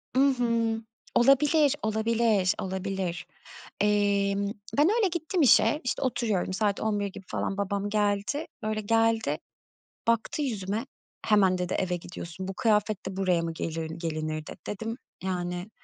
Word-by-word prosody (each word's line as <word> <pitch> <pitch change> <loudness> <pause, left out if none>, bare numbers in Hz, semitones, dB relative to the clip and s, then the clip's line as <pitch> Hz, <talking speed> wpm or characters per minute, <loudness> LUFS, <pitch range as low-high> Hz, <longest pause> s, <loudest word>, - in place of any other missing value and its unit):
I - - +4 0.2
hı! 230 -2 +1 0.3
Olabilir, 280 +3 +5
olabilir, 220 -3 +2
olabilir! 190 -2 -3 0.6
Emm, 200 -1 +2 0.3
ben 305 +5 +5
öyle 425 -4 +4
gittim 345 +1 -1
işe, 295 +3 +5
işte 250 - -2
oturuyorum 220 -8 0
saat 205 0 0
11.00 205 -2 0
gibi 195 0 -9
falan. 195 - -2
Babam 200 0 -1
geldi. 205 +7 0 0.2
Böyle, 215 0 -1
geldi, 225 +1 +2 0.7
baktı 230 +6 +1
yüzüme. 215 -1 -2 0.4
"Hemen." 195 -4 +4
dedi. 180 0 -2
"Eve 180 -1 0
gidiyorsun, 175 +1 -7
bu 195 - -4
kıyafetle 210 -3 0
buraya 185 -3 +2
mı 165 0 -2
gelirin 160 0 -4
gelinir?" 155 -2 -3
dedi. - - -8
Dedim, 225 +3 -4 0.3
yani 180 +1 -3
205 Hz, 135 wpm, -28 LUFS, 185-230 Hz, 0.7 s, Olabilir